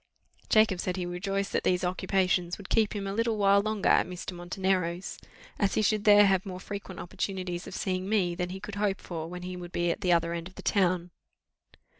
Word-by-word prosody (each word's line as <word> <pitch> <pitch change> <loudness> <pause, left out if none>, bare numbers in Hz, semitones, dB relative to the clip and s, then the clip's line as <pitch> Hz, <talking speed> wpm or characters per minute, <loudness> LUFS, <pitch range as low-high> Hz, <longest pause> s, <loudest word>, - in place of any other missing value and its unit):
Jacob 215 -4 +4
said 185 +1 -2
he 180 - -2
rejoiced 195 +3 -2
that - - 0
these 180 0 +1
occupations 180 -1 0
would 200 - -11
keep 220 -1 +2
him 200 -1 -3
a 195 - -3
little 230 +1 0
while 200 0 +5
longer 215 -1 -1
at - - +4
Mr. 180 +1 -6
Montenero's, 180 0 -2 0.4
as 200 -2 +1
he 215 - +2
should 215 0 +1
there 205 -1 +8
have 190 -2 +3
more 185 -2 -6
frequent 200 -1 -7
opportunities 180 -1 -4
of - - -7
seeing 185 0 -2
me, 190 -5 +2
than 180 +1 -3
he 190 +1 -6
could 205 +1 -8
hope 200 -2 +1
for 165 -2 -6
when 180 0 -7
he 180 0 -5
should 175 0 -8
be 175 -1 +1
at 205 - -4
the 180 -3 +2
other 170 0 +2
end 170 0 -4
of 185 - -16
the - - -10
town. 180 -3 +1
185 Hz, 220 wpm, -29 LUFS, 180-200 Hz, 0.4 s, there